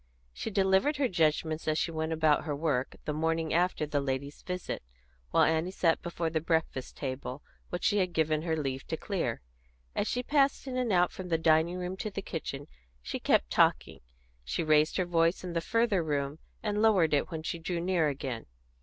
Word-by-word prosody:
She - - -4
delivered 195 +8 +2
her 280 -2 +2
judgments 160 -3 0
as 155 0 +2
she 170 - 0
went 160 0 -2
about 155 -2 +3
her 150 -3 -2
work, 140 -4 -1
the 150 - -1
morning 160 +1 0
after 175 -2 +2
the 145 -1 -1
ladies' 140 +1 -3
visit, 180 -1 -4 0.5
while - - +4
Annie 160 +2 +2
sat 170 -3 +1
before 170 -1 -3
the 160 -1 0
breakfast 160 -5 -1
table, 130 0 -5 0.3
which 175 - -4
she 205 - +3
had 180 -2 +1
given 155 -2 +1
her 160 -1 -1
leave 135 -3 -2
to 160 - -2
clear. 170 - -2 0.5
As 205 - 0
she 250 - -1
passed 280 0 +2
in 260 -2 -4
and 250 -3 0
out 180 -1 +4
from 185 - -7
the 165 - +2
dining 160 +2 +3
room 180 +1 -3
to 215 - -3
the 195 -1 -5
kitchen 145 -6 -5 0.4
she - - -4
kept - - +2
talking; - - +2 0.4
she 65 - -2
raised 155 0 +3
her 185 - +1
voice 170 +1 +2
in 180 -2 -5
the 165 - 0
further 230 0 +2
room, 145 -1 -2 0.2
and 210 -1 0
lowered 190 -8 +4
it 145 - +2
when 160 -3 -5
she 170 - -3
drew 170 +1 -2
near 175 -2 +2
again. 135 -5 -4
165 Hz, 200 wpm, -30 LUFS, 150-185 Hz, 0.5 s, while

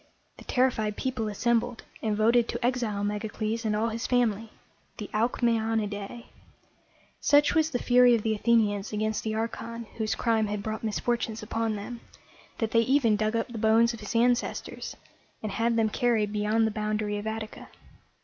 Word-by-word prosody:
The - - -13
terrified 230 -5 +1
people 255 -4 -2
assembled, 235 +2 0 0.2
and 215 -2 -1
voted 230 +2 +4
to 235 +1 -3
exile 235 -5 0
Megacles 215 +2 -2
and 210 -1 +1
all 220 +2 +1
his 230 +1 -3
family, 225 -3 +1 0.5
the 210 - -7
Alc 230 +4 0
mæ 235 -1 +3
on´i 220 -1 0
dæ. 205 +3 -7 1.0
Such 290 0 +4
was 320 -2 +3
the 265 - -1
fury 245 0 +5
of 220 - -2
the 220 - +1
Athenians 215 -2 +1
against 215 0 -1
the 220 -1 -2
archon 230 +1 -4 0.2
whose 215 -1 0
crime 225 -2 +1
had 205 0 -3
brought 220 +1 -4
misfortunes 225 0 -1
upon 225 0 -1
them, 230 +4 -7 0.6
that 225 -3 -1
they 230 - +4
even 240 -2 +3
dug 215 +1 0
up 230 +1 -1
the 235 -2 -6
bones 225 +2 +4
of 230 - -8
his 210 +1 -6
ancestors, 240 +1 0 0.5
and 215 - -3
had 230 +3 +1
them 225 -1 +3
carried 215 -3 +1
beyond 210 +2 +2
the 220 - 0
boundary 210 -1 -2
of 210 - -6
Attica. 220 0 -5
225 Hz, 180 wpm, -27 LUFS, 215-235 Hz, 1.0 s, fury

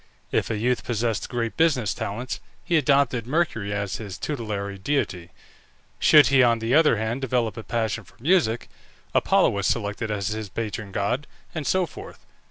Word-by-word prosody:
If - - 0
a 110 - -1
youth 125 +3 0
possessed 115 -1 -1
great 115 -2 -2
business 140 - +2
talents 120 +6 -4 0.2
he 175 - 0
adopted 140 -6 +2
Mercury 130 -9 0
as 100 -1 -2
his 100 -4 -7
tutelary 105 -8 -4
deity; 95 -8 -1 0.7
should 150 -2 +7
he, 135 -1 +5
on 120 -2 +4
the 115 +2 -1
other 155 -6 +5
hand, 110 +4 -2
develop 120 -4 0
a 115 - -6
passion 115 -1 -2
for - - -21
music, 135 -5 +2 0.5
Apollo - - +4
was 100 -1 -1
selected 105 0 -1
as 105 -1 -1
his 110 -1 -4
patron 110 -1 -4
god, 115 +9 -1 0.3
and 155 -4 -4
so 185 -1 +2
forth. 160 - -11
115 Hz, 170 wpm, -24 LUFS, 105-135 Hz, 0.7 s, should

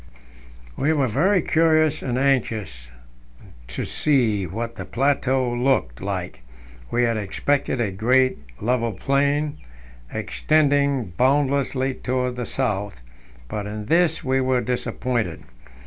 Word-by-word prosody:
We 155 +3 +1
were 140 -4 +1
very 170 - +2
curious 155 -1 +3
and 125 -2 -2
anxious 110 - -1 0.8
to 65 - -3
see 115 -10 +1
what 115 +6 -5
the - - -6
plateau 130 -1 +1
looked. 120 - 0
like. - - -4 0.5
We 120 - +1
had 115 -2 +1
expected 130 +6 -1
a 110 -5 0
great, 130 +6 +2 0.2
level 115 -1 0
plain, 140 +6 0 0.5
extending 140 - +1
boundlessly 135 0 +2
towards 125 -1 -2
the 125 -3 -3
south; 100 - -2 0.4
but 105 - -4
in 105 0 -6
this 165 +4 +2
we 130 -1 +1
were 130 -1 +1
disappointed. 120 -5 -2
130 Hz, 115 wpm, -23 LUFS, 110-140 Hz, 0.8 s, curious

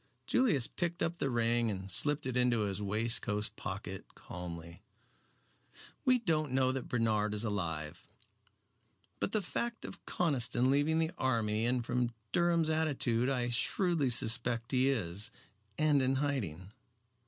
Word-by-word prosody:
Julius 200 - +3
picked 175 +4 -3
up 170 +1 -1
the 135 - -1
ring 120 -1 +1
and 95 -2 -4
slipped 145 - +4
it 130 -1 -3
into 125 -2 +2
his 100 -1 -1
waistcoat 105 0 +1
pocket 95 0 -6
calmly. 85 -1 -8 1.2
"We 255 -1 +5
don't 155 - 0
know 130 0 +3
that 130 -1 -5
Bernard 110 -3 +1
is 105 - +1
alive. 80 -8 -3 1.1
But - - -1
the 215 -2 0
fact 235 +5 -3
of - - -9
Conniston 130 -6 +1
leaving 145 +3 +2
the 165 0 +1
army 115 -3 +1
and 125 -1 0
from 120 -1 -1 0.2
Durham's 170 -2 +2
attitude 135 -6 +1
I 125 -3 0
shrewdly 160 +4 +1
suspect 115 0 +1
he 130 +1 +3
is, 105 -4 -2 0.5
and 150 -2 +3
in 130 +1 +1
hiding. 105 - -2
125 Hz, 140 wpm, -32 LUFS, 105-145 Hz, 1.2 s, We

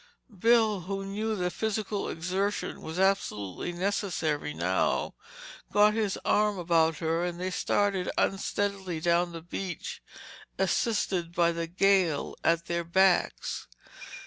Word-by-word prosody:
Bill, 220 0 +4
who 195 +2 -4
knew 215 +3 -2
that 180 -2 -1
physical 215 -2 -2
exertion 185 +5 -2
was 160 +2 -6
absolutely 175 - 0
necessary 175 -5 -1
now, - - 0 0.6
got 210 +1 +5
his 215 -3 0
arm 210 -1 +2
about 165 -2 +2
her 165 +1 0
and 175 -1 -3
they 185 +1 -2
started 195 -1 0
unsteadily 195 -3 -1
down 170 +1 +2
the 165 -1 -8
beach 175 0 -5 0.6
assisted 185 - 0
by 170 -1 +4
the 170 0 -3
gale 185 -3 +2
at 170 0 +2
their 170 0 -1
backs. 185 +2 +1
185 Hz, 120 wpm, -28 LUFS, 170-200 Hz, 0.6 s, got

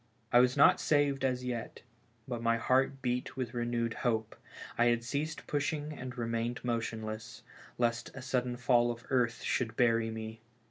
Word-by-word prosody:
I 120 - +8
was 125 +2 +4
not 140 - +7
saved 145 -3 +2
as 125 -1 0
yet, 120 -3 -5 0.4
but 120 -3 -3
my 115 0 +2
heart 135 +3 +1
beat 125 +1 -2
with 125 -2 -3
re 120 -1 -1
newed 115 -1 0
hope. 110 -3 -1 0.4
I 120 - +3
had 120 -1 +2
ceased 145 +6 -3
pushing 150 +1 -2
and 125 -3 -7
remained 115 +1 -2
motionless, 115 -1 -4 0.3
lest 120 -1 0
a 135 - -7
sudden 125 -2 -1
fall 120 -1 +3
of 120 0 -5
earth 120 -3 +1
should 115 -3 -1
bury 115 -2 +3
me. 110 0 -6
120 Hz, 170 wpm, -32 LUFS, 115-130 Hz, 0.4 s, I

